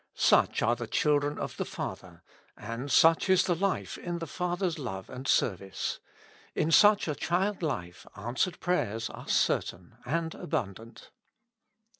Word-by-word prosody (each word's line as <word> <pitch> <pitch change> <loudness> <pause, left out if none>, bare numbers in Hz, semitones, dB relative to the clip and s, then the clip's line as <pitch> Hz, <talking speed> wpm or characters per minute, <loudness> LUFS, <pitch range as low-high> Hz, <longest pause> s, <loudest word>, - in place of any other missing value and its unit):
Such - - +3
are 120 +3 +3
the 120 -1 -6
children 145 +3 +1
of - - -5
the - - -1
Father, - - -7 0.3
and 125 +5 -5
such 165 +7 +5
is 185 -1 +5
the 180 - +1
life 195 +3 -2
in 175 -1 -4
the 165 - -4
Father's 175 -1 -2
love 95 -9 -6
and 130 +2 -7
service: 95 -2 0 0.6
in 160 - +1
such 205 +1 +6
a 150 - 0
childlife 160 - -2
answered 120 - -2
prayers 115 - -1
are - - -10
certain - - 0
and 165 +4 -2
abundant. 115 - -5
150 Hz, 140 wpm, -29 LUFS, 115-175 Hz, 0.6 s, such